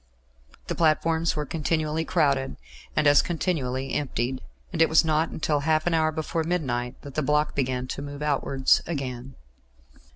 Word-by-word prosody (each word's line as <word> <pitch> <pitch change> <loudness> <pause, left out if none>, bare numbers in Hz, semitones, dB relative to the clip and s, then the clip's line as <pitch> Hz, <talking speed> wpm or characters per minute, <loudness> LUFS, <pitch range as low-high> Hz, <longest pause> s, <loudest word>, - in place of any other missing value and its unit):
The - - -3
platforms 165 +1 +2
were 150 -1 -2
continually 155 +1 -1
crowded, 140 -7 +1 0.4
and 155 - +2
as 145 -1 +7
continually 135 -7 -2
emptied, 130 -2 -2 0.3
and - - 0
it 165 - +5
was 160 +1 +5
not 160 +1 +1
until 150 -1 0
half 155 +2 +1
an 175 - +1
hour 160 -1 +2
before 160 +1 -2
midnight 130 -8 -2
that 140 - -9
the 155 - 0
block 150 +1 +1
began 130 -2 -1
to - - -4
move 145 +1 -6
outwards 140 -2 +2
again. 130 -5 -5
150 Hz, 160 wpm, -26 LUFS, 135-160 Hz, 0.4 s, as